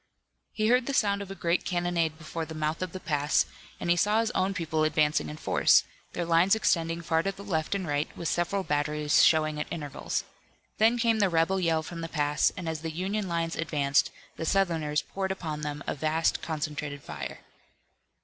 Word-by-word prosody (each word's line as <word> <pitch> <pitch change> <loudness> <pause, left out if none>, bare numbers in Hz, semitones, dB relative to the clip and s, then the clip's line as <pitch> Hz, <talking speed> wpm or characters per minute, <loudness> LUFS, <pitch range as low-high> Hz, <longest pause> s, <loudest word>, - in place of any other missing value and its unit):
He 215 +1 0
heard 250 0 +3
the 275 - -1
sound 200 -4 +2
of 200 - -7
a 195 - -6
great 170 -1 0
cannonade 175 -3 0
before 165 0 -5
the 160 0 -7
mouth 155 +2 -2
of 185 -2 -3
the 185 - -6
pass, 150 -3 +1 0.3
and 170 - 0
he - - +5
saw 210 +5 +3
his 225 -1 0
own 195 +1 0
people 160 -3 0
advancing 150 - +2
in 75 - -7
force, - - +4 0.3
their 175 - -2
lines 170 +4 +4
extending 165 -5 0
far 165 -1 +2
to 195 - -1
the 195 +1 -11
left 165 -2 -1
and 190 -3 -3
right, 145 +1 0
with 170 - -3
several 175 +5 0
batteries 150 -1 +2
showing 155 -1 +3
at - - -3
intervals. 145 -3 -3 0.6
Then 225 +3 +5
came 230 -2 +2
the 200 -2 +3
rebel 170 +3 +2
yell 165 -3 +1
from 165 +1 -7
the 165 - -5
pass 145 -2 +2
and 180 -2 -5
as 160 -1 -3
the 165 - -3
Union 190 +5 -2
lines 165 -1 -1
advanced 145 -4 +1 0.3
the - - -4
Southerners 160 -5 +1
poured 190 -1 -3
upon 155 -5 -4
them 145 -1 -4
a - - -1
vast 155 +2 0
concentrated 150 -2 -4
fire. - - -7
165 Hz, 200 wpm, -28 LUFS, 155-190 Hz, 0.6 s, he